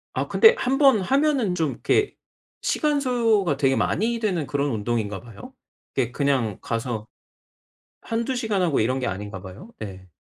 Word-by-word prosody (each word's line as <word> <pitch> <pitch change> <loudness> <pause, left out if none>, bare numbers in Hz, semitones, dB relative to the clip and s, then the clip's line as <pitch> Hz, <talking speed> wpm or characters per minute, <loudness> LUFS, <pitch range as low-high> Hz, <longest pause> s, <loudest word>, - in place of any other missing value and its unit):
아 - - -1
근데 450 +1 +6
1 270 - +1
번 270 -7 +5
하면은 270 -3 +1
좀 160 -5 0
이렇게 410 - 0 0.5
시간 300 -2 +1
소요가 225 - +2
되게 135 -2 +2
많이 230 - 0
되는 185 -9 -1
그런 140 +1 -1
운동인가 105 -2 -2
봐요. 115 -4 -12 0.4
네 125 -3 0
그냥 130 -7 0
가서 115 -2 -3 0.9
1-2 235 +3 -2
시간 220 -5 0
하고 165 -6 +2
이런 130 +4 +1
게 130 - -2
아닌가 95 0 -5
봐요. 100 - -11
예. 95 -3 -8
145 Hz, 280 characters per minute, -24 LUFS, -, 0.9 s, 근데